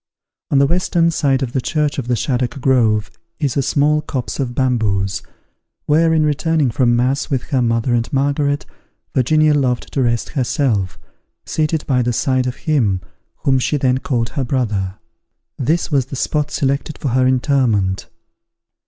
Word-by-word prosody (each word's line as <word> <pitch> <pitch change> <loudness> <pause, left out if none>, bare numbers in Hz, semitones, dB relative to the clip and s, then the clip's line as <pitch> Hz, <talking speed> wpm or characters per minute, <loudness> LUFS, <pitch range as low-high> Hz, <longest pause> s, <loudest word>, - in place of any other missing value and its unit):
On 140 - +2
the 140 - +5
western 170 +1 +1
side 135 -4 +1
of 125 -1 -4
the 130 - 0
church 150 +1 -1
of 125 - -4
the 125 - +1
Shaddock 125 +2 -1
Grove 115 -5 +2 0.3
is 145 -6 -1
a 140 - +2
small 150 +3 +2
copse 130 -4 -4
of 125 -3 -2
bamboos, 105 -7 0 0.6
where, 160 +2 +3
in 155 -1 +3
returning 150 -2 +1
from 120 0 +2
mass 130 +3 0
with 130 -4 -1
her 130 -3 +2
mother 115 +1 +1
and 115 -1 0
Margaret, 145 +1 0 0.5
Virginia 155 +4 +3
loved 130 -4 0
to 140 - +1
rest 120 -2 0
herself, 120 -8 0 0.5
seated 155 0 -1
by 130 -3 +2
the 120 0 0
side 130 +2 +1
of 125 - -3
him 115 - +1 0.4
whom 135 -1 +3
she 145 +4 0
then 130 -2 +1
called 120 -4 -1
her 140 - -3
brother. 105 -7 -1 0.6
This 160 +7 0
was 135 -3 +1
the 135 - -6
spot 150 +2 -1
selected 140 +2 -1
for 140 - -2
her 130 +1 +2
interment. 125 -8 +1
130 Hz, 165 wpm, -18 LUFS, 120-145 Hz, 0.6 s, the